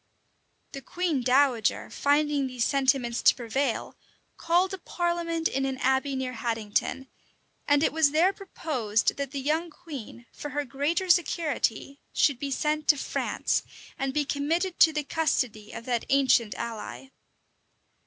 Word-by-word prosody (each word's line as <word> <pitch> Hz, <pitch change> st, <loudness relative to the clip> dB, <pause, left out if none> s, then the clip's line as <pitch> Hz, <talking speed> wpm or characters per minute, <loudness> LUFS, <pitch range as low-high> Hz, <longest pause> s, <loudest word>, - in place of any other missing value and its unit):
[*] -, -, -45 dB
The 275 Hz, -, -7 dB
queen 330 Hz, 0 st, -1 dB
dowager, 255 Hz, -2 st, +2 dB
finding 290 Hz, -1 st, +1 dB
these 250 Hz, -2 st, -1 dB
sentiments 265 Hz, -3 st, +1 dB
to -, -, +6 dB
prevail, 245 Hz, +1 st, -2 dB, 0.4 s
called 355 Hz, +3 st, +1 dB
a 385 Hz, -, -5 dB
parliament 340 Hz, -2 st, -1 dB
in 270 Hz, -, -2 dB
an 265 Hz, -1 st, -2 dB
abbey 265 Hz, +1 st, +1 dB
near 260 Hz, -1 st, -3 dB
Haddington; 225 Hz, +3 st, -2 dB, 0.6 s
and 290 Hz, 0 st, +4 dB
it -, -, +2 dB
was 315 Hz, -2 st, +4 dB
there 335 Hz, +6 st, +3 dB
proposed 260 Hz, -, -1 dB
that 280 Hz, -1 st, -3 dB
the 275 Hz, +1 st, -5 dB
young 310 Hz, +5 st, 0 dB
queen, 290 Hz, -8 st, -10 dB
for 295 Hz, -, -7 dB
her 290 Hz, +1 st, -2 dB
greater 290 Hz, +9 st, -1 dB
security, 295 Hz, -6 st, 0 dB
should 280 Hz, -5 st, +2 dB
be 280 Hz, -1 st, -3 dB
sent 300 Hz, +2 st, -1 dB
to 300 Hz, -, +5 dB
France, -, -, -1 dB, 0.3 s
and 270 Hz, 0 st, -2 dB
be 295 Hz, +2 st, 0 dB
committed 330 Hz, +6 st, -1 dB
to 320 Hz, -, +7 dB
the 300 Hz, -1 st, -2 dB
custody 255 Hz, -8 st, -1 dB
of 230 Hz, 0 st, -8 dB
that 240 Hz, -2 st, -1 dB
ancient 260 Hz, -5 st, +3 dB
ally. 235 Hz, +3 st, -6 dB
280 Hz, 150 wpm, -27 LUFS, 255-315 Hz, 0.6 s, to